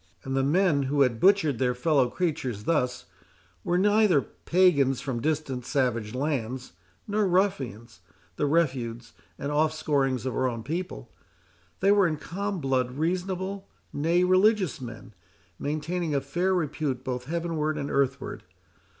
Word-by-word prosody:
And 135 0 -3
the 135 - +2
men 155 +1 +3
who 140 -2 +4
butchered 150 - +3
their 125 -1 +1
fellow 135 -1 +2
creatures 130 - -2
thus, 125 -4 0 0.6
were 175 - +1
neither 205 -3 +4
pagans 150 -8 +2
from 130 -4 -3
distant 145 -4 -1
savage 120 -4 -1
lands, 130 -3 -2 0.4
nor 210 -1 +1
ruffians, 135 - -1 0.4
the 145 - 0
refuse 125 -7 -1 0.2
and 140 - -4
offscourings 150 -4 +1
of 130 - -2
our 130 - +1
own 115 -2 -5
people. 155 - -5 0.7
They 195 +1 +5
were 200 -2 +5
in 155 -2 -2
calm 200 +5 -4
blood 130 -3 0
reasonable, 185 +5 -2 0.2
nay, 165 +5 +2
religious 185 -3 +3
men, 120 -2 -9 0.5
maintaining 155 +2 -2
a 140 - +1
fair 175 +8 0
repute 150 -6 -2
both 125 -1 -4
heavenward 160 -1 -2
and 140 -1 -3
earthward. 135 -1 -1
150 Hz, 135 wpm, -27 LUFS, 130-180 Hz, 0.7 s, They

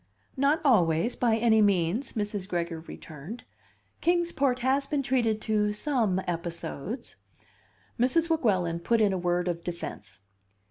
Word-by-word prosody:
"Not 280 +4 +2
always, 180 - +3
by 230 -3 +2
any 220 -1 +4
means," 200 +4 +1
Mrs. 205 -3 -3
Gregory 170 -3 -2
returned. 160 - -9 0.6
"Kings 345 0 +2
Port 270 -3 +1
has 270 +2 +1
been 280 -1 -1
treated 240 -4 +1
to 210 -1 +1
some 215 -5 +1
episodes 170 - -5 0.4
" - - -35
Mrs. 320 +7 +3
Weguelin 190 - +1
put 230 +7 +1
in 205 -3 +3
a - - 0
word 175 0 0
of 170 -1 -2
defence. 110 - -7
210 Hz, 140 wpm, -28 LUFS, 175-255 Hz, 0.6 s, any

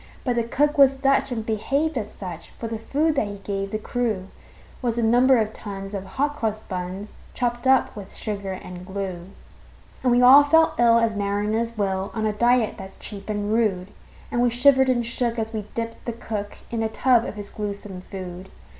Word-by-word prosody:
But 250 -2 0
the 235 - +1
cook 290 +6 +1
was 275 -1 +7
Dutch, 270 0 +2
and 225 -3 -3
behaved 280 +9 0
as 215 -4 -3
such; 175 -4 -8
For 230 - -4
the 225 -1 -4
food 300 +7 +1
that 275 -7 0
he 205 0 -6
gave 195 0 -3
the 215 - -2
crew 215 -4 -2 0.5
Was 240 -2 -1
a 235 - +1
number 245 +3 +5
of 220 -1 0
tons 195 -1 -7
of 195 -1 -4
hot 285 +9 -1
cross 215 -4 -1
buns, 185 +1 -6 0.2
Chopped 240 0 -1
up 265 0 +4
with 200 -3 -9
sugar 200 -2 -4
and 180 -1 -8
glue. 185 -2 -5 0.7
And 250 - +2
we 245 +1 +4
all 270 +4 +9
felt 320 +3 +4
ill 230 -1 +6
as 230 -1 +2
mariners 210 +3 -1
will, 195 -1 -1
On 220 -1 -1
a 215 - +1
diet 240 +1 +2
that's 190 0 -9
cheap 200 -1 -8
and 205 0 -1
rude; 200 -5 0 0.4
And 240 - +1
we 245 - +4
shivered 265 +2 +4
and 240 -2 +1
shook 235 0 -1
as 225 0 -3
we 210 -2 -4
dipped 230 0 -4
the 235 - -3
cook 215 -3 -5
In 230 -1 -1
a 220 - 0
tub 245 +1 +3
of - - -5
his 205 -1 -7
gluesome 200 -2 -5
food. 185 0 -8
220 Hz, 205 wpm, -24 LUFS, 200-245 Hz, 0.7 s, all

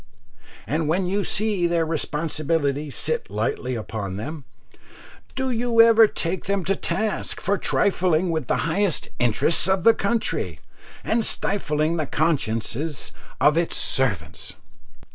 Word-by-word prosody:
and 155 +1 -1
when 180 +4 +1
you 195 +3 -1
see 205 -5 +1
their 170 -1 +1
responsibilities 150 -2 -2
sit 155 -7 -1
lightly 110 +5 -2
upon 105 -4 -5
them, 145 +6 -6 0.9
do 265 -1 -1
you 235 -1 0
ever 230 -1 +7
take 180 -2 -3
them 200 -2 -1
to 195 +3 +1
task 205 +4 -2
for 200 - 0
trifling 185 -4 +1
with 160 -6 -2
the - - 0
highest 185 +1 -1
interests 120 +9 +2
of 190 -2 +1
the 230 - +7
country, 200 - -1 0.4
and 225 +1 +1
stifling 160 -6 0
the 155 -3 -2
consciences 140 -2 -2 0.3
of 150 +2 +4
its 170 - 0
servants? 105 - +1
165 Hz, 130 wpm, -23 LUFS, 145-195 Hz, 0.9 s, ever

